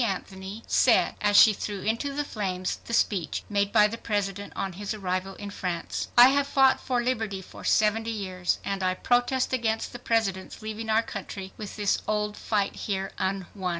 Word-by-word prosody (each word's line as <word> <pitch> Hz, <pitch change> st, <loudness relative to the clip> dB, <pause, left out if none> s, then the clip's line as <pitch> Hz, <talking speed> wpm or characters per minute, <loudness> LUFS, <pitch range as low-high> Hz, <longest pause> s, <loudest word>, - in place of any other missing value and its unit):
Anthony, 195 Hz, 0 st, -4 dB
said, -, -, +4 dB
as 205 Hz, -1 st, +4 dB
she 220 Hz, -, +9 dB
threw 200 Hz, -1 st, -5 dB
into 230 Hz, +7 st, -1 dB
the 290 Hz, +1 st, -2 dB
flames 185 Hz, -8 st, -3 dB
the -, -, -8 dB
speech 185 Hz, -8 st, 0 dB
made 200 Hz, -1 st, 0 dB
by 210 Hz, -1 st, +6 dB
the 225 Hz, +2 st, -2 dB
President 205 Hz, -2 st, -2 dB
on 190 Hz, -1 st, -3 dB
his 205 Hz, +4 st, -4 dB
arrival 190 Hz, -1 st, -3 dB
in 205 Hz, 0 st, -7 dB
France: 180 Hz, -4 st, -3 dB
"... -, -, -28 dB
I 245 Hz, +2 st, +10 dB
have 280 Hz, +1 st, +2 dB
fought 270 Hz, -1 st, +4 dB
for 245 Hz, -2 st, -1 dB
liberty 220 Hz, -6 st, -1 dB
for 190 Hz, -, -12 dB
seventy 220 Hz, +1 st, +2 dB
years, 185 Hz, -5 st, -2 dB
and 195 Hz, -1 st, -2 dB
I 185 Hz, 0 st, +1 dB
protest 245 Hz, +5 st, +1 dB
against 225 Hz, -3 st, 0 dB
the 245 Hz, -, -7 dB
President's 220 Hz, -4 st, -1 dB
leaving 220 Hz, +1 st, -5 dB
our 220 Hz, +1 st, +3 dB
country 190 Hz, -2 st, -7 dB
with 210 Hz, -2 st, -7 dB
this 205 Hz, -2 st, +1 dB
old 210 Hz, 0 st, -1 dB
fight 205 Hz, -3 st, -1 dB
here 195 Hz, -1 st, -3 dB
unwon." 190 Hz, 0 st, -2 dB
205 Hz, 185 wpm, -27 LUFS, 195-225 Hz, -, I